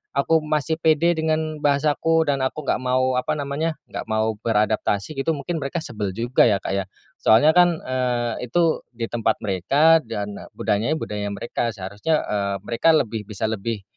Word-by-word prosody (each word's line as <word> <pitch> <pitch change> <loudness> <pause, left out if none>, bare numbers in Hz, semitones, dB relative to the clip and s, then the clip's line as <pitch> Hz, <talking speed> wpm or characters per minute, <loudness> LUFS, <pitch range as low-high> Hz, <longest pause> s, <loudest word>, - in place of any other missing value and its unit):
aku 160 +4 +3
masih 155 +1 -1
pede 160 +1 +3
dengan 155 -1 -1
bahasaku 150 +3 +2
dan 140 - -1
aku 130 +3 -2
nggak 140 - 0
mau 130 0 +1
apa 125 - -2
namanya 150 +3 -2 0.2
nggak - - -5
mau 110 0 +1
beradaptasi 105 +2 0
gitu 160 +4 0
mungkin 160 +4 -4
mereka 145 +4 -3
sebel 105 -5 -4
juga 120 +4 +3
ya, 100 -3 +1
Kak, - - -3
ya, 95 - -4 0.3
soalnya 120 +8 +5
kan, 175 -1 +3
eee, 125 -2 -2
itu 165 +5 +2 0.2
di 115 - -5
tempat 115 -2 +1
mereka 140 - +4
dan 105 -6 -6
budayanya 110 +9 0
budaya 105 -9 -4
mereka 115 +3 -3
seharusnya, 100 +11 -1
eee, 100 -1 -1
mereka 160 +8 +3
lebih 110 -7 -1
bisa 110 +1 -3
lebih, 110 -1 -3
130 Hz, 170 wpm, -22 LUFS, 110-155 Hz, 0.3 s, soalnya